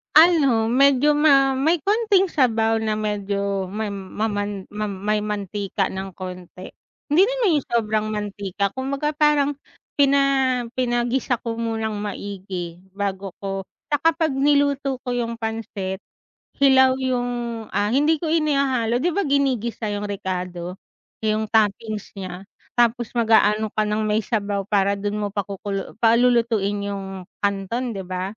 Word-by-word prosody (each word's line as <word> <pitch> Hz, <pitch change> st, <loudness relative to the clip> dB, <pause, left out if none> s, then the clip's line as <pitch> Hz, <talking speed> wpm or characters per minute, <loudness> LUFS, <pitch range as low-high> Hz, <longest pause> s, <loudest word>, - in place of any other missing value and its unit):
Ano, 280 Hz, -9 st, +5 dB
medyo 275 Hz, +2 st, +5 dB
ma 285 Hz, -2 st, +5 dB
may 315 Hz, +5 st, +3 dB
konting 405 Hz, -3 st, +2 dB
sabaw 225 Hz, -4 st, +2 dB
na 215 Hz, -1 st, -1 dB
medyo 200 Hz, -2 st, -2 dB
ma 210 Hz, +2 st, -3 dB
maman 205 Hz, 0 st, -3 dB
ma 210 Hz, 0 st, -3 dB
may 205 Hz, +2 st, -1 dB
mantika 205 Hz, -1 st, -2 dB
ng 190 Hz, -1 st, -6 dB
konti, 185 Hz, -1 st, -8 dB, 0.4 s
hindi 335 Hz, +6 st, +6 dB
naman 460 Hz, -11 st, +2 dB
yung -, -, -13 dB
sobrang 215 Hz, -2 st, 0 dB
mantika 205 Hz, -2 st, -2 dB
kumbaga 275 Hz, +4 st, -2 dB
parang 290 Hz, -1 st, +2 dB, 0.4 s
pina 275 Hz, -2 st, +3 dB
pinagisa 245 Hz, +1 st, 0 dB
ko 230 Hz, -1 st, -3 dB
munang 220 Hz, -2 st, -2 dB
maigi 190 Hz, -4 st, -5 dB, 0.2 s
bago 195 Hz, -2 st, -3 dB
ko 195 Hz, -1 st, -4 dB, 0.2 s
'tsaka 320 Hz, +2 st, +3 dB
pag 320 Hz, -2 st, +1 dB
niluto 280 Hz, -1 st, +1 dB
ko 250 Hz, -, -3 dB
yung 235 Hz, -1 st, -2 dB
pansit, 220 Hz, -4 st, -4 dB, 0.6 s
hilaw 265 Hz, -1 st, +6 dB
yung, 245 Hz, -3 st, -2 dB
ah, 205 Hz, +1 st, +1 dB
hindi 295 Hz, +6 st, +2 dB
ko 330 Hz, -, -2 dB
inihahalo 275 Hz, -7 st, +1 dB
'di 335 Hz, -, +1 dB
ba 400 Hz, -, +1 dB
ginigisa 255 Hz, -6 st, 0 dB
yung 205 Hz, 0 st, -3 dB
rekado? 180 Hz, -3 st, -4 dB, 0.5 s
Yung 215 Hz, 0 st, 0 dB
toppings 215 Hz, -1 st, 0 dB
niya 185 Hz, -1 st, -7 dB, 0.3 s
tapos 240 Hz, -1 st, +2 dB
mag-aano 220 Hz, -2 st, +3 dB
ka 215 Hz, -, -1 dB
ng 215 Hz, +1 st, 0 dB
may 215 Hz, +1 st, +1 dB
sabaw 205 Hz, -2 st, -1 dB
para 200 Hz, -1 st, +2 dB
dun 205 Hz, +1 st, -2 dB
mo 205 Hz, -, -3 dB
pakuku 200 Hz, 0 st, -4 dB
palulutuin 230 Hz, -4 st, +3 dB
yung 195 Hz, -1 st, -6 dB, 0.2 s
kanton 205 Hz, +4 st, -1 dB
'di 190 Hz, -, -5 dB
ba? 185 Hz, +3 st, -4 dB
220 Hz, 135 wpm, -22 LUFS, 200-265 Hz, 0.6 s, hindi